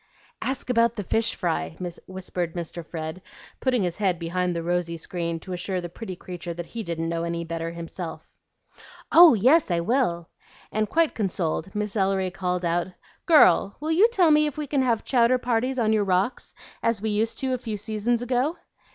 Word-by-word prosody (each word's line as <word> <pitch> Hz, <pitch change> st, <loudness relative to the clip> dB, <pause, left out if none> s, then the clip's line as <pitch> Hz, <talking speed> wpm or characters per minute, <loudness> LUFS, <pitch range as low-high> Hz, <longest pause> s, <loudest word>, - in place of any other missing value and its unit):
"Ask 260 Hz, -1 st, -2 dB
about 235 Hz, -1 st, +3 dB
the 205 Hz, -, -4 dB
fish 225 Hz, +4 st, 0 dB
fry," 80 Hz, +1 st, -2 dB, 0.3 s
whispered 185 Hz, -2 st, -4 dB
Mr. 170 Hz, 0 st, -5 dB
Fred, 160 Hz, +2 st, -6 dB, 0.4 s
putting 250 Hz, -5 st, +1 dB
his 175 Hz, -2 st, -2 dB
head 190 Hz, -4 st, +1 dB
behind 180 Hz, +1 st, -1 dB
the 170 Hz, -, -2 dB
rosy 175 Hz, -1 st, -1 dB
screen 170 Hz, 0 st, -3 dB
to 185 Hz, -, -7 dB
assure 185 Hz, +1 st, -2 dB
the 175 Hz, -1 st, -6 dB
pretty 185 Hz, +1 st, -7 dB
creature 175 Hz, -1 st, -7 dB
that 175 Hz, 0 st, -5 dB
he 230 Hz, +6 st, -6 dB
didn't 165 Hz, -4 st, -3 dB
know 165 Hz, 0 st, -2 dB
any 170 Hz, 0 st, -2 dB
better 165 Hz, 0 st, -4 dB
himself. 170 Hz, -1 st, -7 dB, 0.9 s
"Oh 335 Hz, -6 st, +9 dB
yes, 260 Hz, -, +4 dB
I 170 Hz, -1 st, +1 dB
will!" 170 Hz, -4 st, 0 dB, 0.4 s
and, 215 Hz, 0 st, 0 dB
quite 330 Hz, -1 st, +2 dB
consoled, 190 Hz, -2 st, -2 dB
Miss 210 Hz, 0 st, -2 dB
Ellery 190 Hz, -2 st, +1 dB
called 180 Hz, -1 st, -2 dB
out, 170 Hz, +1 st, +1 dB, 0.4 s
"Girl, 200 Hz, -, +5 dB
will 310 Hz, +2 st, -2 dB
you 375 Hz, +8 st, +6 dB
tell 370 Hz, -9 st, +3 dB
me 300 Hz, 0 st, +5 dB
if 295 Hz, -, -6 dB
we 300 Hz, -, -2 dB
can 280 Hz, -1 st, 0 dB
have 235 Hz, -4 st, +1 dB
chowder 250 Hz, -1 st, +3 dB
parties 250 Hz, +1 st, 0 dB
on 220 Hz, -3 st, +2 dB
your 215 Hz, -1 st, +2 dB
rocks 190 Hz, +5 st, -1 dB, 0.3 s
as 230 Hz, -2 st, +1 dB
we 220 Hz, +1 st, -2 dB
used 220 Hz, +2 st, 0 dB
to 265 Hz, -1 st, -1 dB
a 255 Hz, -, -1 dB
few 220 Hz, -3 st, -4 dB
seasons 220 Hz, +3 st, -1 dB
ago?" 255 Hz, +7 st, 0 dB
195 Hz, 190 wpm, -25 LUFS, 170-240 Hz, 0.9 s, Oh